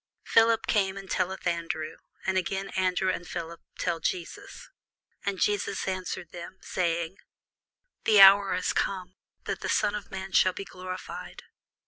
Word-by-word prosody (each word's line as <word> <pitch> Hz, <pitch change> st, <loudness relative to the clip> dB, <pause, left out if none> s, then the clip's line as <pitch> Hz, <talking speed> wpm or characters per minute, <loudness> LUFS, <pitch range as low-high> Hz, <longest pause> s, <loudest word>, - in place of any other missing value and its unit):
Philip 225 Hz, 0 st, +4 dB
cometh 195 Hz, -2 st, +1 dB
and 195 Hz, -1 st, -10 dB
telleth 190 Hz, 0 st, -1 dB
Andrew: 165 Hz, -2 st, -2 dB, 0.3 s
and 190 Hz, -, +1 dB
again 190 Hz, +2 st, -1 dB
Andrew 185 Hz, 0 st, +1 dB
and 175 Hz, -1 st, -5 dB
Philip 165 Hz, 0 st, -6 dB, 0.2 s
tell 170 Hz, -2 st, -1 dB
Jesus. 395 Hz, -, -4 dB, 0.6 s
And 195 Hz, -2 st, -1 dB
Jesus 200 Hz, 0 st, 0 dB
answered 185 Hz, -3 st, -4 dB
them, 175 Hz, +2 st, -9 dB
saying, 170 Hz, 0 st, -1 dB, 0.9 s
The 215 Hz, -2 st, +6 dB
hour 195 Hz, 0 st, +8 dB
is 185 Hz, -, 0 dB
come, 185 Hz, -2 st, -1 dB, 0.3 s
that -, -, -3 dB
the -, -, -3 dB
Son 205 Hz, -, +2 dB
of 210 Hz, -2 st, -5 dB
man 190 Hz, 0 st, -6 dB
should 185 Hz, -1 st, +4 dB
be 195 Hz, -, -5 dB
glorified. 185 Hz, -1 st, -7 dB
185 Hz, 145 wpm, -28 LUFS, 175-195 Hz, 0.9 s, hour